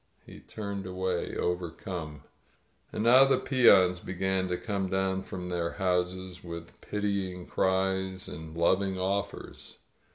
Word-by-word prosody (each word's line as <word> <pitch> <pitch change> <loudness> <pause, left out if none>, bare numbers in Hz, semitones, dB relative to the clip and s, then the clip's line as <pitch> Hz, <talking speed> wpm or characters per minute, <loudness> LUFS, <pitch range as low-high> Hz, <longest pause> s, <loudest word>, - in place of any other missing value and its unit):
He - - -12
turned 100 -3 -6
away, 95 -1 -2
overcome. 85 -3 -3 0.7
And 105 - -2
now 125 +3 +8
the 135 - +4
peons 95 -9 +5
began 95 +1 -1
to 90 -1 -1
come 100 -3 -2
down 95 0 0
from 90 -1 -6
their 85 -1 -1
houses, 90 -1 -1
with 85 -1 -9
pitying 100 -3 -2
cries 95 0 0
and 80 +1 -8
loving 95 +3 +2
offers. 100 +2 -3
95 Hz, 125 wpm, -29 LUFS, 90-95 Hz, 0.7 s, now